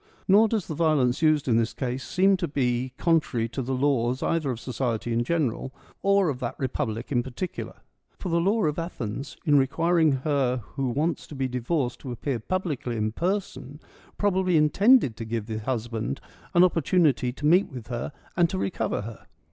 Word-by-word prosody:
Nor 210 +4 +6
does 215 -5 -1
the - - -5
violence 150 -5 +2
used 155 -3 +3
in 115 -3 +3
this 115 0 0
case 130 0 -3
seem 195 +1 +3
to 180 -2 -2
be 125 -3 -1
contrary 150 -9 +1
to 135 - -4
the 130 +1 -2
laws 130 -2 +1
either 165 -4 0
of 120 -3 -3
society 120 -2 -2
in 115 +1 +1
general 135 -4 -1 0.3
or 200 -1 +3
of 130 -4 -3
that 125 0 -3
republic 115 -3 -3
in 120 -3 +2
particular. 130 +9 -6 0.4
For 185 - -5
the 170 0 +2
law 205 +5 +2
of 150 +1 0
Athens, 135 -6 -5
in 145 -2 +5
requiring 160 +3 +2
her 130 -5 +1
who 135 -2 -1
wants 150 +5 -1
to 150 - -9
be 135 -1 -1
divorced 125 +1 -2
to 130 - -7
appear 120 +1 -3
publicly 145 - -2
in 110 0 0
person, 175 - -3 0.4
probably 190 -4 +2
intended 155 - +4
to - - -5
give 115 -1 -3
the 110 -1 -4
husband 115 - -3 0.4
an 175 - +7
opportunity 165 -7 +2
to 145 - -6
meet 180 +6 +4
with 125 -4 -9
her 120 +3 -3 0.2
and 175 -2 +3
to 190 - -3
recover 115 - -1
her. 115 0 -10
135 Hz, 185 wpm, -26 LUFS, 120-170 Hz, 0.4 s, an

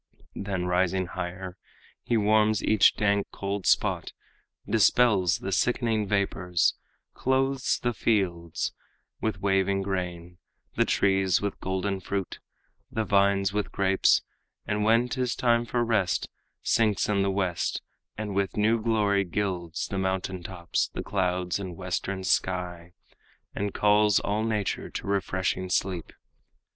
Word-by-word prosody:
Then 95 -3 -3
rising 90 +1 +1
higher, 90 +1 -6 0.4
he 120 - 0
warms 110 0 +3
each 110 -2 +5
dank, 100 -1 +1
cold 100 -1 -4
spot, - - +1 0.5
Dispels 105 -5 +4
the 95 - -5
sickening 115 +1 +1
vapors, 95 -3 +1 0.4
clothes 135 0 +1
the 120 0 +1
fields 90 -8 -1 0.5
With 110 - -2
waving 95 0 +2
grain, 90 -2 -4 0.3
the - - +2
trees 95 -1 +2
with 100 -1 -3
golden 95 +1 -2
fruit, 95 0 -4 0.5
The 110 - -1
vines 100 -2 +2
with 105 0 -2
grapes; 95 -1 +3 0.4
and 105 0 -1
when 115 +3 +4
'tis 125 -2 -1
time 120 -1 +2
for 120 +1 0
rest, 105 -6 +1 0.4
Sinks 105 -4 +2
in 100 -2 +1
the 100 - +1
west, 95 -3 -1 0.3
and 105 -2 -4
with 100 +1 -1
new 110 +2 +2
glory 105 -3 +2
gilds 90 -3 -3
The 95 - -3
mountain 95 -1 -2
tops, 85 -1 -2
the - - -5
clouds 90 -1 -1
and 95 -3 -6
western 95 +1 -3
sky, 90 -2 -1 0.6
And 100 0 -2
calls 105 0 +4
all 105 +2 -1
nature 105 -3 -2
to - - -6
refreshing 95 -1 -1
sleep. 90 -2 -1
100 Hz, 130 wpm, -27 LUFS, 95-105 Hz, 0.6 s, each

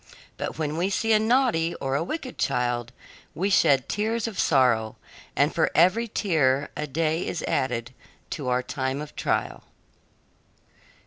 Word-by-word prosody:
But - - -5
when 155 -1 -2
we 180 +3 +1
see 225 +3 +1
a 215 - +5
naughty 220 -8 +2
or 135 -1 -3
a 140 - +1
wicked 265 - -6
child 120 0 0 0.4
we 195 +4 0
shed 140 -7 +4
tears 225 +2 -1
of 210 -5 -6
sorrow, 120 -6 +2 0.4
and - - +2
for - - +2
every 185 +8 +4
tear 150 -10 +1
a 150 - -3
day 160 +3 0
is 170 - -3
added 125 -1 -1 0.4
to 145 -5 -4
our 125 0 +1
time 130 +1 -3
of 150 0 -8
trial." - - -2
155 Hz, 150 wpm, -25 LUFS, 130-200 Hz, 0.4 s, a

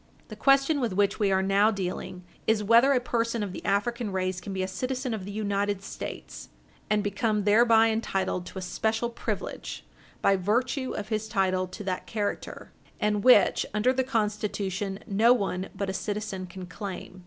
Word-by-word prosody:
The - - -7
question 275 +2 +3
with 240 -6 -1
which 200 +1 +1
we 200 -2 +2
are 190 0 +2
now 200 +2 +4
dealing 185 -2 -4 0.2
is 220 -1 +3
whether 230 +6 +6
a 265 - +4
person 230 -2 -1
of 195 -3 -4
the - - -7
African 210 +3 0
race 185 -1 -2
can 200 - -7
be 190 -1 -2
a - - -1
citizen 255 +4 -3
of 205 -4 -4
the 200 - -6
United 200 -1 -1
States, - - -7 0.4
and 210 -1 +2
become 210 +1 0
thereby 225 +2 +5
entitled 195 -4 -1
to - - -9
a 190 - -4
special 220 +6 -1
privilege - - -5 0.3
by 195 - +3
virtue 250 +7 0
of 210 0 -5
his 215 -1 -1
title 185 -3 +1
to 195 +4 -8
that 185 -2 -3
character, 210 -2 -4 0.3
and 210 -1 +1
which, 245 -7 +6
under 235 +5 +3
the 260 0 +1
Constitution, 210 -4 -2
no 220 +5 +4
one 195 -5 -2
but 200 +1 -2
a 190 - -2
citizen 200 -1 -4
can 185 +1 -8
claim. 185 0 -7
205 Hz, 180 wpm, -27 LUFS, 190-230 Hz, 0.4 s, whether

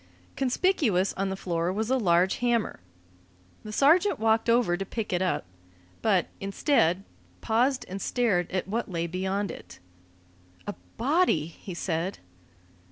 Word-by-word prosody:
Conspicuous 255 - +1
on 195 0 -2
the 190 - -2
floor 170 -2 -1
was 220 +5 -2
a 265 - +4
large 180 -2 +3
hammer. 240 -2 0 0.8
The 215 - -7
sergeant 330 - +4
walked 225 +1 +2
over 230 -7 +3
to 195 - -3
pick 210 +1 -4
it 180 - +1
up, 185 - 0 0.6
but, 195 -5 +3
instead, 195 - +1 0.4
paused 250 - +1
and 195 +2 -6
stared 205 -8 +1
at 185 -1 -2
what 225 +3 -2
lay 170 -2 -2
beyond 190 +2 -2
it. - - -11 0.9
"A - - -3 0.2
body!" 275 - +2
he 170 +2 -9
said. 170 +2 -2
195 Hz, 140 wpm, -27 LUFS, 180-240 Hz, 0.9 s, a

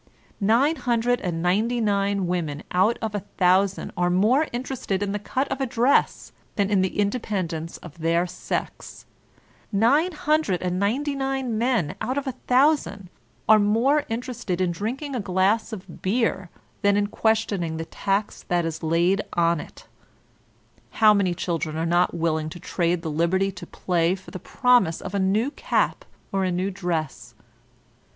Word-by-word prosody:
Nine 240 +10 +3
hundred 245 0 0
and 170 -3 -3
ninety 220 +7 +1
nine 200 -2 +1
women 165 -5 -2
out 190 +6 +3
of 220 -1 -2
a 205 - -1 0.2
thousand 190 +1 +2
are 175 0 +1
more 220 - +3
interested 240 -5 -3
in 200 - -2
the 205 - -2
cut 260 +6 -2
of 275 - -3
a 265 - 0
dress 245 +3 +1 0.2
than 200 -1 0
in 195 -2 +3
the 185 - -2
independence 190 -7 -2
of 170 -1 -12
their 165 +2 +1
sex; 180 0 -5 0.7
nine 270 - +3
hundred 300 - 0
and 180 0 -1
nine 215 +8 +1
nine 270 -4 -1
men 225 - +1
out 255 +4 -2
of 285 - -2
a 265 - -1 0.2
thousand 250 - +2 0.4
are 220 0 +7
more 235 +8 +3
interested 230 -5 -3
in 185 -2 +1
drinking 250 - -4
a 240 - -1
gbss 195 +4 +1
of 190 -5 -9
beer 195 -3 0 0.3
than 200 -1 +3
in 205 - +2
questioning 205 -6 0
the 165 - -4
tax 200 +5 -2
that 175 -1 +1
is 160 -1 -4
laid 170 +5 +2
on 170 -1 +2
it; - - -11 1.1
how 215 -1 +7
many 190 -4 +1
children 165 -3 -3
are 165 - -1
not 175 +1 +2
willing 160 -2 -1
to 175 - -9
trade 170 0 -1
the 160 - -3
liberty 180 +5 +1
to 180 - -10
play 175 0 0
for 190 - -13
the 185 - -6
promise 240 -6 +2
of 190 - -7
a 200 - 0
new 210 +8 +1
cap - - -1 0.3
or 195 -1 0
a 185 - +1
new 185 +3 -1
dress? 170 -6 -4
195 Hz, 165 wpm, -24 LUFS, 175-235 Hz, 1.1 s, are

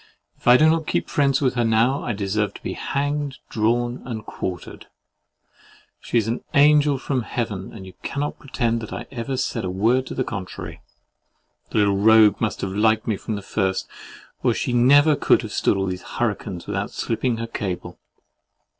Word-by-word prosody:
If - - -14
I 125 +1 +8
do 155 - +5
not 160 0 +2
keep - - -1
friends 140 -2 +2
with 130 -3 +2
her 120 -1 +1
now, 115 +5 +2
I - - -2
deserve 100 0 -1
to - - -12
be - - -3
hanged, 145 0 -2
drawn, 120 +3 0
and 110 -4 -6
quartered. 90 -3 -6 1.1
She - - -1
is 110 -2 +1
an 115 +2 -2
angel 145 0 +5
from 130 -1 -2
Heaven, 110 -5 -4
and 95 -4 -10
you 95 - -11
cannot 145 +1 -3
pretend 115 -4 -1
I - - -5
ever 130 +1 -4
said - - -2
a 90 - -2
word 115 +8 +1
to - - -6
the 130 - 0
contrary! 100 -6 -7 0.9
The - - -3
little 100 -2 +3
rogue 110 0 +5
must 110 - -1
have 95 - -2
liked 110 +2 +2
me 110 - 0
from 110 +2 -4
the 100 - -6
first, 95 -2 -1 0.5
or - - +2
she 125 - -2
never 145 +5 +5
could 125 - +3
have 110 - -6
stood - - +2
all 95 - 0
these 90 -1 -4
hurricanes 105 -6 -3
without - - -3
slipping 120 +1 -1
her 115 - -3
cable. 100 -5 -5
115 Hz, 185 wpm, -23 LUFS, 105-130 Hz, 1.1 s, I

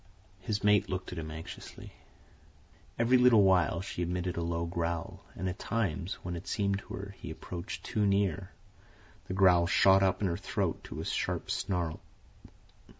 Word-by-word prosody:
His 105 +2 -3
mate 105 -1 +4
looked 95 0 -4
at 90 - -5
him 80 -1 -5
anxiously. 80 +3 -9 1.0
Every 120 +2 +4
little 125 -4 +7
while 90 -3 +3
she 90 - -5
emitted 90 +1 -2
a 85 - -2
low 85 0 -1
growl, 85 0 -3
and 95 - -3
at 90 +1 -4
times, 95 -4 -1
when 90 -1 -4
it 85 - -8
seemed 100 -1 0
to - - -11
her 100 0 -7
he - - -7
approached 85 +4 -6
too 105 - -1
near, 100 -1 +1 0.8
the 95 - -3
growl 90 -3 +5
shot 95 +1 +5
up 95 -1 +2
in 100 - +1
her 85 -1 -1
throat - - -2
to - - -6
a - - -6
sharp - - -2
snarl. 85 -4 -1
95 Hz, 170 wpm, -31 LUFS, 85-100 Hz, 1.0 s, little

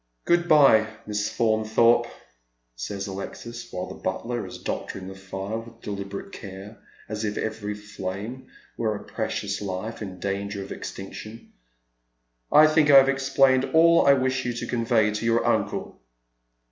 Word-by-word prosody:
" - - -48
Good 175 0 +3
bye, 135 -9 +6 0.2
Miss 105 0 -1
Faunthorpe," 115 +1 +3 0.7
says 100 +11 -4
Alexis, 115 +4 -7
while 90 0 -3
the 95 - -8
butler 120 +6 -3
is - - -8
doctoring 95 -1 -5
the 95 - -7
fire 95 +3 -5
with 115 0 -13
deliberate 100 -1 -6
care, 100 +1 -9 0.3
as 105 0 -4
if 105 -1 -2
every 105 -1 -3
flame 105 +4 -6 0.3
were 110 -2 0
a - - -8
precious 100 +1 -3
life 100 +4 -5
in 95 -3 -7
danger 100 +1 -3
of 95 - -11
extinction. 110 +3 -8 0.5
" - - -49 0.3
I 155 - +8
think 155 -1 +4
I 140 - +9
have 135 0 +7
explained 135 0 +3
all 165 0 +6
I 140 - +8
wish 130 0 0
yon 120 -1 -2
to - - -4
convey 115 -2 +2
to 105 +2 -4
your 115 0 +2
uncle." - - -1
110 Hz, 160 wpm, -25 LUFS, 100-120 Hz, 0.7 s, I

